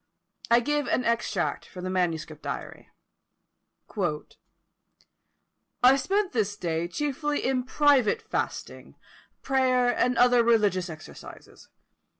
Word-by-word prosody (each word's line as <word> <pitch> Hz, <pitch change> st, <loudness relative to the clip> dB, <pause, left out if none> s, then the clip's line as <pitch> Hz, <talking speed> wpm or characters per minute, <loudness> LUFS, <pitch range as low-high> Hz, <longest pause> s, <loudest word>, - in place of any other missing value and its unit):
I 235 Hz, +1 st, +5 dB
give 295 Hz, +2 st, -1 dB
an 250 Hz, -, 0 dB
extract 235 Hz, 0 st, -1 dB
from 180 Hz, -2 st, -10 dB
the 185 Hz, -, -3 dB
manuscript 165 Hz, -4 st, -2 dB
diary: -, -, -7 dB, 2.9 s
"I 255 Hz, +2 st, +7 dB
spent 385 Hz, +8 st, 0 dB
this 210 Hz, -4 st, -1 dB
day 165 Hz, -1 st, -2 dB
chiefly 295 Hz, -, -2 dB
in 255 Hz, -1 st, 0 dB
private 290 Hz, -, +3 dB
fasting, 440 Hz, -, -5 dB, 0.5 s
prayer, 255 Hz, -2 st, +2 dB
and 250 Hz, -1 st, +1 dB
other 245 Hz, -1 st, +5 dB
religious 205 Hz, -6 st, +2 dB
exercises. 155 Hz, -1 st, -12 dB
245 Hz, 105 wpm, -26 LUFS, 185-275 Hz, 2.9 s, I